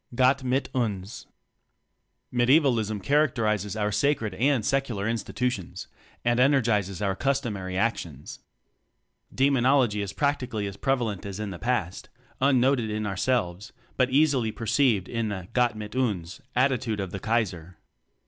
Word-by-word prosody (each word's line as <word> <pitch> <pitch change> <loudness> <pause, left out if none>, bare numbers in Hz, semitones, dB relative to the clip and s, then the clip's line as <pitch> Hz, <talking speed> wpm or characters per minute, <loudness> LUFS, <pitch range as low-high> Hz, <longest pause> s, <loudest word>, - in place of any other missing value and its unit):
"Gott 130 +2 +3
mit 130 +2 0
tins." 105 -5 -3 1.1
Medievalism 120 -5 +3
characterizes 110 -9 +1
our 105 -1 0
sa 105 +7 +2
cred 110 -7 -5
and 135 -5 +2
secular 135 -7 0
institutions 115 -3 -3 0.4
and 120 0 +2
energizes 110 -8 +2
our 95 -1 0
customary 110 -10 -2
actions. 85 - -3 0.9
Demonology 130 -4 +3
is 100 -2 -3
practically 125 -6 -1
as 100 -1 -5
prev 135 +4 0
alent 105 -5 -3
as 100 0 -6
in 105 -2 -4
the 85 - -8
past; 110 -7 -2 0.3
unnoted 130 -3 +3
in 105 0 -2
ourselves 100 -2 -1 0.2
but 130 -1 +2
easily 135 -5 +2
perceived 115 -3 +1
in 115 -2 -2
the 95 -3 -5
"Gptt 120 -3 +2
mit 105 +1 -7
uns" 100 -9 -2
attitude 125 -4 +1
of 95 -3 -4
the 100 - -5
Kaiser. 90 -7 -2
115 Hz, 135 wpm, -26 LUFS, 100-130 Hz, 1.1 s, Gott